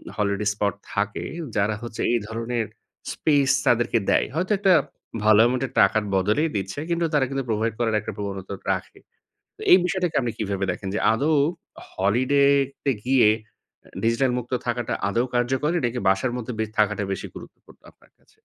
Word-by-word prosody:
Holiday 105 0 -1
spot 100 -1 0 0.2
থাকে 105 +2 -2 0.3
যারা 105 +1 +1
হচ্ছে 115 -2 -6
এই 120 - +2
ধরনের 115 0 -2 0.5
স্পেস 145 -3 +2 0.2
তাদেরকে 120 0 +3
দেয়। - - +3
হয়তো 185 +5 -1
একটা 190 -2 +4 0.5
ভালো 110 0 +6
অ্যামাউন্টের 125 +1 0
টাকার 105 +1 +4
বদলেই 105 +12 +2
দিচ্ছে। 95 +6 -3
কিন্তু 170 0 +1
তারা 145 -3 +3
কিন্তু 135 -1 -2
প্রোভাইড 110 +1 0
করার 115 -2 +1
একটা - - -5
প্রবণতা 100 -1 -5 0.2
রাখে। - - -7 0.6
তো - - -14
এই 180 - +10
বিষয়টাকে 180 -2 -1
আপনি 120 -2 -2
কিভাবে 100 -2 -2
দেখেন 95 +2 -6
যে - - 0
আদৌ 145 +7 +1 0.6
হলিডে 125 +9 +2 0.4
তে 140 - +2
গিয়ে 130 -4 +5
এ 110 -1 -26
ডিজিটাল 115 +3 +2
মুক্ত 125 +1 -6
থাকাটা 120 -1 -2
আদৌ 115 +5 +1
কার্যকরী 130 +7 +1
নাকি 120 +1 -2
বাসার 95 +6 +2
মধ্যে 125 +1 -5
বে - - +2
থাকাটা 105 -1 +2
বেশি 95 - -4
গুরুত্বপূর্ণ - - -14
আপনার - - -27
কাছে? - - -31
115 Hz, 165 wpm, -24 LUFS, 105-130 Hz, 0.6 s, এই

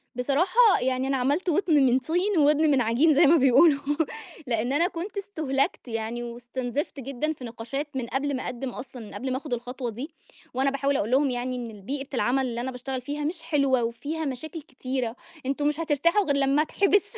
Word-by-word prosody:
بصراحة، 360 - +4
يعني 255 +1 0
أنا 270 0 +1
عملت 285 +9 0
ودن 345 0 +2
من 255 0 +4
طين 355 +8 0
وودن 300 +1 +4
من 270 -3 +3
عجين 245 +8 +3
زَي 305 +4 +6
ما 330 +4 +6
بيقولوا، 280 +2 +5 0.7
لإن 240 +2 0
أنا 335 +5 +3
كنت 370 +3 -6
استُهلكت 310 -11 -1
يعني 225 +1 -3
واستُنزفت 245 +4 -4
جدًا 275 +4 -2
في 270 - -13
نقاشات 240 +5 -5
من 255 -3 -2
قبل 275 +3 -1
ما 255 - -4
أقَدِّم 250 +2 -4
أصلًا، 250 0 -8
من - - -12
قبل 260 0 -4
ما 255 - 0
آخُد 285 -1 -5
الخطوة 245 +1 -4
دي. 250 +8 -6 0.4
وأنا 265 +2 +2
باحاول 275 0 0
أقول 215 - -2
لهم 275 +2 +3
يعني 250 +1 -2
إن 240 -2 -5
ال 210 -2 -12
بيئة 275 +6 -4
العمل 260 +1 +1
اللي 235 -1 -3
أنا 260 +2 -3
باشتغل 255 +1 -5
فيها 290 +4 -4
مش 325 +3 -3
حلوة 275 -6 +2
وفيها 290 +8 -3
مشاكل 305 +4 -5
كتيرة، 255 -4 -4 0.3
أنتم 280 +2 0
مش 300 +1 -1
هترتاحوا 330 +5 +2
غِير 285 - +1
لمّا 280 +1 +3
أتحبِِس. 395 +5 +3
270 Hz, 200 wpm, -26 LUFS, 250-305 Hz, 0.7 s, زَي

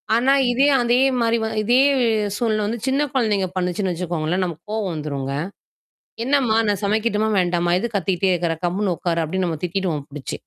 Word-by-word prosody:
ஆனா, 255 +4 +3 0.2
இதே, 270 +4 +3
அதே 240 +1 +2 0.2
மாரி 230 0 +2
வ - - 0 0.2
இதே 245 +4 +3 0.6
சூழ்நில 215 -3 0
வந்து 230 +2 -3
சின்ன 270 +2 +1
குழந்தைங்க 210 -7 +1
பண்ணுச்சுன்னு 185 +1 -1
வெச்சுக்கோங்களேன். 175 0 -2
நமக்கு 170 -1 -7
கோவம் 205 -5 -2
வந்துருங்க. 140 -3 -4 0.9
"என்னம்மா? 260 -5 +2
நான் 205 -1 -1
சமைக்கட்டுமா, 215 +1 +1
வேண்டாமா? 175 -1 +1
எது 235 - -2
கத்திக்கிட்டே 190 -1 0
இருக்கறே. 170 -2 0
கம்முன்னு 185 +1 0
உட்காரு!" 170 -2 -1
அப்படினு 185 +3 -1
நம்ம 160 - -3
திட்டிடுவோம் 170 -5 -2
புடிச்சு. 145 -1 -7
190 Hz, 160 wpm, -21 LUFS, 170-225 Hz, 0.9 s, ஆனா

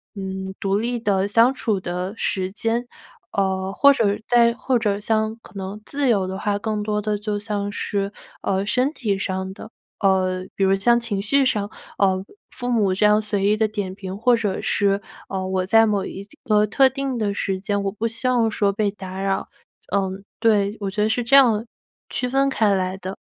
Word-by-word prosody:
嗯， 190 -1 -5
独 195 0 +1
立 240 +3 -1
的 200 -4 +1
相 230 +5 +4
处 220 -6 -1
的 180 +2 -3
时 190 -4 -1
间。 230 +3 -1 0.5
呃， 190 -1 0
或 280 +7 +6
者 210 -6 +1
再 235 -1 +5
或 255 +1 0
者 205 -2 0
像 220 +1 0
可 - - -16
能 195 +2 -6
自 285 -1 -1
由 200 -5 +2
的 190 +1 -4
话， 205 +1 -1
更 215 0 -2
多 210 0 -1
的 210 0 -1
就 210 0 -3
像 205 -1 -3
是， 200 -1 -2 0.3
呃， 195 0 0
身 255 +5 +1
体 215 -10 -1
上 190 -1 -3
的， 215 - -11 0.3
呃， 185 -2 +2
比 195 - +1
如 190 0 +4
像 235 +5 +3
情 215 -4 -2
绪 275 +7 +2
上， 210 -4 0 0.3
呃， 190 -1 +2 0.3
父 245 -1 -5
母 210 -6 +2
这 205 +3 +2
样 210 +1 +5
随 205 -2 -1
意 210 - +4
地 215 -1 +1
点 200 -3 -4
评 190 -1 -6
或 240 +3 +4
者 210 -4 -1
是， 200 0 +1 0.3
呃， 190 -1 -3
我 185 -1 -1
在 225 +4 +5
某 205 -2 +1
一 200 +1 -7 0.2
个 210 -1 +3
特 265 +5 +4
定 270 -1 -3
的 205 -3 0
时 195 -1 -1
间， 200 +1 -1
我 200 - -1
不 215 +3 -4
希 230 +3 -1
望 235 -3 +2
说 200 -1 +1
被 205 0 0
打 190 -1 -7
扰。 195 0 -1 0.5
嗯， 195 0 -1 0.2
对， 210 -3 +3
我 200 - -2
觉 210 - -2
得 210 - +3
是 225 +3 0
这 235 +4 -4
样， 230 -5 +5 0.4
区 250 - -1
分 275 +2 +2
开 215 -5 +2
来 185 0 -1
的。 190 0 -6
205 Hz, 220 characters per minute, -22 LUFS, 195-225 Hz, 0.5 s, 或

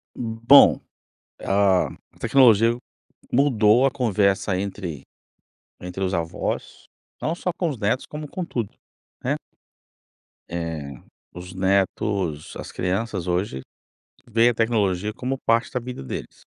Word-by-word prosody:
Bom, 115 +4 +5 0.6
a 95 -2 +3
a - - -15
tecnologia 115 -3 +5 0.6
mudou 120 -2 +4
a 135 - +3
conversa 100 -5 +1
entre 95 -6 -4 0.8
entre 90 +2 -6
os 95 0 0
avós, 85 -1 -3 0.4
não 160 - -1
só 180 +1 -2
com 170 0 -1
os 140 - -4
netos 110 +5 0
como 150 0 -7
com 180 +3 -4
tudo, 115 -9 -3 0.5
né. - - 0 1.2
Eh, 80 -5 -4 0.4
os 90 +1 -9
netos 95 -3 0
as - - -7
crianças 95 0 -2
hoje, 90 -7 -1 0.7
veem 115 +1 +4
a - - 0
tecnologia 105 -3 0
como 130 +3 -3
parte 115 +1 +2
da 125 - -1
vida 125 - -7
deles. 65 - -7
105 Hz, 125 wpm, -23 LUFS, 90-120 Hz, 1.2 s, Bom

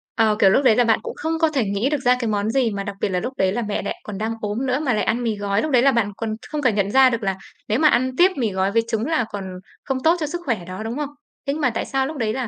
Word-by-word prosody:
Ờ, 220 -2 +3
kiểu, 195 - +6
lúc 270 - +3
đấy 240 -5 +5
là 245 - +4
bạn 225 -2 +3
cũng - - -6
không 320 +1 -2
có 320 -1 +3
thể 265 - +2
nghĩ 200 +6 0
được 300 - 0
ra 250 -1 +4
cái 235 - -2
món 210 0 0
gì 240 -2 +1
mà 200 0 -3
đặc 200 0 -6
biệt - - +1
là 180 - 0
lúc 250 +8 -4
đấy 190 -1 +2
là 240 - -1
mẹ 210 -2 -2
lại 200 - -5
còn 205 -2 -6
đang 220 +2 -2
ốm 215 +5 -2
nữa 255 +1 0
mà 275 -6 0
lại 210 - 0
ăn 240 +2 0
mì 225 -2 0
gói. 200 0 -1
Lúc 310 - -2
đấy 245 -2 +5
là 275 - +5
bạn 225 -5 0
còn 220 -1 -3
không 300 -1 -3
cả 255 - +4
nhận 200 -1 0
ra 265 +1 +6
được 235 -2 -3
là 195 -1 0 0.3
nếu 215 - +1
mà 305 - +5
ăn 255 -1 +2
tiếp 370 +2 +6
mì 230 -5 0
gói 190 +1 0
với 230 +1 +3
trứng 225 0 -1
là 310 -7 +1
còn 200 -2 -5 0.4
không 270 - -2
tốt 330 +2 +5
cho 310 - -1
sức 350 +3 -5
khỏe 215 -9 -1
đó, 185 +4 -6
đúng 225 +4 -4
không? 295 -1 -3 0.4
Thế 280 - +1
nhưng 315 - -4
mà 285 - +3
tại 230 - -3
sao 270 -1 -1
lúc 310 +1 -6
đấy 220 -4 -1
là, 255 -1 -3
230 Hz, 340 wpm, -22 LUFS, 210-270 Hz, 0.4 s, kiểu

